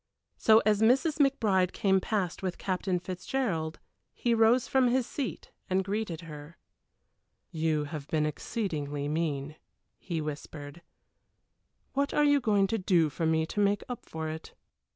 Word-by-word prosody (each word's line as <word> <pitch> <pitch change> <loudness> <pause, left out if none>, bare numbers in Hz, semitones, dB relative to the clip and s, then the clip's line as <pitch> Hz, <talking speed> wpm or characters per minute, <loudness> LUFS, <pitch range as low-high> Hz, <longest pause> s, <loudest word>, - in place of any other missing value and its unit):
So 220 0 +5
as 215 -1 +3
Mrs. 270 +7 +3
McBride 215 -10 +3
came 190 -1 +3
past 190 -4 -2
with 185 -2 -3
Captain 185 -1 -1
Fitzgerald, 185 -2 -2 0.4
he 240 - +1
rose 230 +2 +4
from 260 -1 +3
his 250 0 +2
seat 270 -1 -5 0.2
and 190 +1 +2
greeted 195 -4 -3
her. 150 0 -10 0.9
"You 160 -2 0
have 150 -1 -6
been 155 -1 +1
exceedingly 150 -4 -3
mean," 150 -1 -2 0.4
he 170 -3 -3
whispered. 150 0 -7 1.1
"What 280 +1 0
are 295 - +4
you 290 -1 +5
going 210 -6 +3
to 225 +3 -1
do 170 -5 +3
for 165 +3 -1
me 160 0 +2
to 190 - -5
make 205 0 +2
up 245 -2 -7
for 160 0 -4
it?" 160 +1 -7
185 Hz, 150 wpm, -29 LUFS, 160-225 Hz, 1.1 s, So